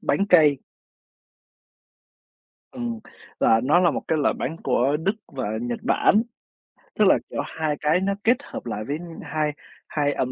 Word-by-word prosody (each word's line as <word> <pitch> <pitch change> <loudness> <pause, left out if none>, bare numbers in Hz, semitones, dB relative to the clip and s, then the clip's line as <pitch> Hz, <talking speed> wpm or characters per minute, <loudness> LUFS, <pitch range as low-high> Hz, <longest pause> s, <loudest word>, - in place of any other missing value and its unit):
bánh 200 - +1
cây. 150 -6 +6 2.1
Ừm, 240 -2 -4 0.4
là 115 0 +4
nó 150 +7 +4
là 175 -3 +4
một - - -3
cái 160 - +1
loại 145 - +2
bánh 160 +5 -3
của 135 +2 +2
Đức 195 +7 -1
và 130 -7 -4
Nhật 120 -1 -3
Bản, 210 - +3 0.7
tức - - +4
là, - - +6
kiểu, - - -5
hai 155 -2 -2
cái 155 +5 +2
nó 200 +1 0
kết 240 +2 +4
hợp - - -8
lại 110 -2 -4
với 145 - -2 0.3
hai 150 -1 -1 0.3
hai 145 -1 0
ẩm 130 - -2
150 Hz, 165 wpm, -24 LUFS, 135-180 Hz, 2.1 s, cây